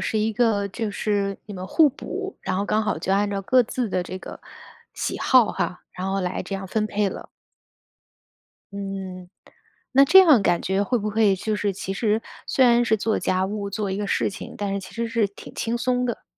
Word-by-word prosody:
是 220 - -1
一 220 +1 0
个 215 -3 +2
就 220 +2 -3
是 200 -1 -1
你 205 - -8
们 185 0 -6
互 315 - +5
补， 390 +8 -6
然 185 -1 -2
后 200 - 0
刚 215 +1 +1
好 215 - -1
就 190 - -1
按 205 +1 +2
照 200 -1 -2
各 255 +5 +4
自 240 +1 -3
的 185 -2 -1
这 185 +1 -7
个 - - -10 0.5
喜 - - -3
好 250 -4 +4
哈， 180 - -3
然 185 +1 -4
后 195 0 0
来 180 0 -2
这 195 - -5
样 195 0 -5
分 215 +3 -1
配 205 -1 0
了。 - - -8 1.4
嗯， 195 -2 -6 0.6
那 275 +2 +7
这 380 +7 +8
样 300 - +6
感 175 - +2
觉 190 +1 +1
会 245 +4 0
不 215 0 -2
会 210 -2 +3
就 215 +3 -2
是 205 -1 0
其 195 0 -5
实 215 +2 0 0.2
虽 265 - +3
然 240 0 +5
是 220 -1 +2
做 220 +1 0
家 185 0 0
务， 200 0 -4
做 205 -1 -2
一 190 - -2
个 205 0 -2
事 - - 0
情， 190 - -9
但 205 -1 -2
是 200 - -2
其 185 - -12
实 235 0 -2
是 230 -2 +1
挺 200 - -13
轻 230 +1 -1
松 250 0 0
的？ 235 - -4
205 Hz, 240 characters per minute, -24 LUFS, 195-230 Hz, 1.4 s, 这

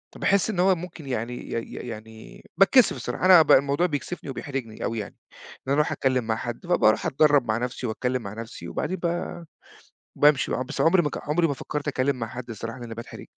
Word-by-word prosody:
فباحس 200 +1 +2
إن 200 -5 -2
هو 190 +1 +4
ممكن 170 -2 -9
يعني 125 -2 -3
ي 120 - -7
ي 115 - -4
يعني 110 -1 -10 0.2
باتكسف 230 +5 +6
الصراحة، - - -3
أنا 185 -3 +9
بقى - - +6
الموضوع 140 +5 +1
بيكسِفني 150 0 -5
وبيحرِجني 135 -4 -5
أوي 115 -1 -2
يعني، 105 - -7 0.2
إن - - -16
أنا 135 - +2
أرُوح 150 +1 +2
أتكلّم 130 -2 +1
مع 110 - +1
حد، 120 +6 -6
فبارُوح 110 -12 +3
أتدرّب 145 -2 +3
مع 110 0 +1
نفسي 125 +1 -3
وأتكلّم 125 +3 -2
مع 100 -2 -7
نفسي، 110 -6 -8
وبعدين 185 - -3
ب 170 - -1 1.1
بامشي 145 -2 +4
بقى، 130 - -1
بس 130 - -4
عُمري 170 +5 +5
ما 150 - -1
ك - - -5
عُمري 165 +2 +3
ما 145 - -1
فكرت 145 +2 -5
اتكلّم 135 -1 0
مع 115 -3 -4
حد 120 +1 -8
الصراحة 115 +3 -6
لإني 120 -2 -7
باتحرِج. 115 +1 -9
130 Hz, 210 wpm, -25 LUFS, 115-155 Hz, 1.1 s, أنا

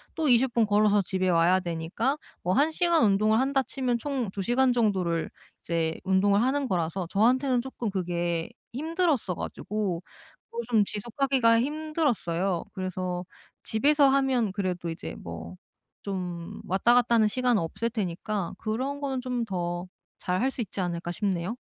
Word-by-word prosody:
또 320 -2 0
20 245 +1 +4
분 230 -2 +3
걸어서 210 0 +4
집에 185 0 0
와야 175 +2 +4
되니까 175 - -2 0.3
뭐 180 - +1
1 295 +6 +3
시간 340 -2 +3
운동을 215 +1 +3
한다 270 +1 +2
치면 250 -2 -1
총 260 -5 -2
2 195 - -4
시간 250 +5 +3
정도를 190 -8 +1 0.3
이제 165 -1 -1
운동을 200 +2 +3
하는 270 +3 +1
거라서 175 -1 -1
저한테는 250 +5 +3
쪼끔 245 -3 -4
그게 175 -3 -1 0.2
힘들었어 310 - 0
가지고 200 -4 -3 0.5
그거 465 +1 -4
좀 220 -3 +5
지속하기가 230 +2 +2
힘들었어요. 250 - -1
그래서 185 -2 -3 0.4
집에서 285 +6 +3
하면 265 -6 +2
그래도 185 -3 -2
이제 165 - -6
뭐 85 +1 -8 0.5
좀 180 -4 -5
왔다 195 +6 +3
갔다 245 -1 +4
하는 220 -2 +5
시간은 245 -1 +1
없을 195 +8 -2
테니까 200 -2 -3
그런 260 +6 -2
거는 270 -2 -2
좀 250 -2 -2
더 175 -3 -3 0.3
잘 180 +2 -1
할 260 - +2
수 260 - -5
있지 200 -2 -4
않을까 175 -1 -3
싶네요. 190 +2 -2
215 Hz, 310 characters per minute, -27 LUFS, 180-255 Hz, 0.5 s, 좀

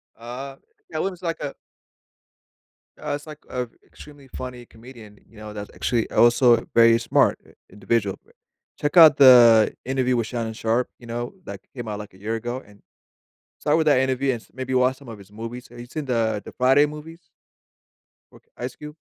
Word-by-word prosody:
Uh, 125 +4 -8 0.4
Katt - - -2
Williams 185 -2 -4
like 165 -1 -3
a 145 -2 -5 1.4
uh, - - -4
it's, 145 +2 -10
like, 150 -1 -10
uh, 125 -1 -3 0.2
extremely 145 -2 -15
funny 125 -1 -8
comedian, 115 -3 -15
you 115 - -19
know, 105 0 -9
that's 105 -1 -7
actually 120 -3 -1
also 120 +1 +5
a - - -7
very 115 0 +6
smart 115 - +2
i - - -20 0.2
individual 105 -2 -1
b - - -25 0.5
check 145 +4 -1
out 160 -3 +9
the 120 -5 +7
interview 130 -1 0
with 115 - 0
Shannon 115 -1 -4
Sharpe, 115 +2 0
you 120 - -14
know, 120 +1 -5
that - - -7 0.2
came 120 -3 -6
out, 105 -1 -4
like, 105 -2 -10
a 95 - -17
year 110 +3 -3
ago, 120 +3 -5
and 105 -1 -20 0.8
start 150 +1 +1
with 160 - +1
that 145 -4 +4
interview 130 0 0
and 115 - -4
s - - -23
maybe 130 0 -4
watch 130 +1 +2
some 140 -2 -16
of 110 -2 -9
his 100 +1 -16
movies, 115 +3 -8
have 120 - -14
you 120 - -9
seen 150 +4 -6
the 110 -4 0
the - - -10
Friday 135 +3 +4
movies 155 +3 -10 1.1
with - - -19
Ice 125 +1 -6
Cube? 150 0 -10
125 Hz, 195 wpm, -23 LUFS, 115-135 Hz, 1.4 s, out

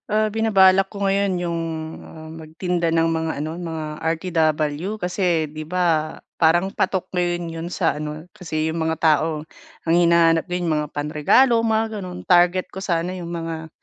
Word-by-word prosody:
Ah, 215 +1 +2
binabalak 195 -3 +4
ko 200 -1 -4
ngayon 195 0 +1
yung, 170 -1 -2 0.4
ah, 160 0 -11
magtinda 165 +2 -3
ng 165 0 +2
mga 160 0 -1
ano, 155 - -3
mga 165 -3 -5 0.2
RTW 160 +1 0
kasi 180 -3 0
'di 155 +1 -7
ba, 165 -3 0 0.2
parang 175 +4 +3
patok 185 -1 0
ngayon 175 -1 0
'yon 165 +1 -5
sa 165 -5 0
ano, 150 +1 -6
kasi 155 -3 -3
yung 165 +1 -3
mga 160 0 0
tao 155 -1 +1 0.4
ang 165 - +3
hinahanap 170 -1 +4
din 180 0 -1
yung 160 - +1
mga 150 - -6
panregalo, 150 - +3
mga 220 -1 0
gano'n. 180 -1 -8
Target 180 +1 +4
ko 190 - -6
sana 175 -1 -1
yung 170 -1 -6
mga, 165 -1 -5
170 Hz, 165 wpm, -22 LUFS, 160-185 Hz, 0.4 s, binabalak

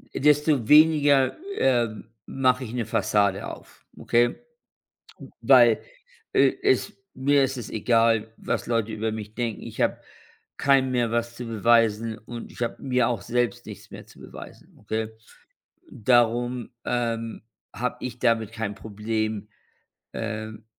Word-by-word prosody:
desto 150 -4 +2
weniger, 150 -3 +5 0.2
ähm, 120 -4 +1 0.2
mache 130 -1 +1
ich 115 - -8
'ne 120 -2 -2
Fassade 100 -3 +1
auf, - - -12
okay? 120 +1 +2 1.1
Weil, - - +6 0.5
äh, - - +4
es 400 -1 +2 0.2
mir 140 +1 +3
ist 135 0 -2
es 120 - -7
egal, 115 -1 +1
was - - -3
Leute 115 -2 0
über 110 0 -2
mich 105 0 -7
denken. 115 -3 -3
Ich - - -8
habe - - +1 0.6
keinem 135 -2 +3
mehr 120 -2 0
was 120 0 -2
zu 125 - -6
beweisen 115 0 +2
und 115 +2 -9
ich - - -13
habe 120 - -3
mir 125 -3 +1
auch 115 -5 -2
selbst 120 0 -1
nichts - - -11
mehr - - -9
zu - - -19
beweisen, - - -12
okay? 110 +1 -3 0.8
Darum, 120 +1 +1
ähm, 115 -2 -2 0.3
habe 125 +5 -2
ich 125 -1 -6
damit 115 -3 +1
kein 110 -3 -4
Problem, 110 0 -4 0.6
ähm, 110 -1 -5
115 Hz, 135 wpm, -25 LUFS, 110-125 Hz, 1.1 s, Weil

